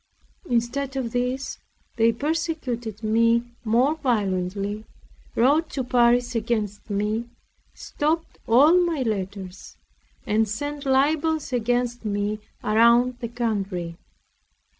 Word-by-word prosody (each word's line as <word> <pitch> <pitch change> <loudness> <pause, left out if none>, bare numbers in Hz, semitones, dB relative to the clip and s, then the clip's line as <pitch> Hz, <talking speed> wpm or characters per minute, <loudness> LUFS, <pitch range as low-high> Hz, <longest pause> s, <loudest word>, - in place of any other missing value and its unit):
Instead 255 +4 -1
of 250 -4 -2
this, 250 +2 -2 0.4
they 230 0 +4
persecuted 255 - -3
me 230 +2 +3 0.2
more 240 +6 +3
violently, 205 -5 -1 0.5
wrote 295 +7 +3
to 265 - -3
Paris 245 0 +3
against 215 -3 -2
me, 210 +3 -1 0.5
stopped 320 +3 -2
all 300 +10 +6
my 325 -6 0
letters, 195 -4 -5 0.5
and 215 0 +1
sent 290 +6 -4
libels 300 +2 +1
against 245 0 0
me 205 0 -1 0.2
around 235 +3 +4
the 235 - -4
country. 200 -8 -2
235 Hz, 100 wpm, -24 LUFS, 215-270 Hz, 0.5 s, all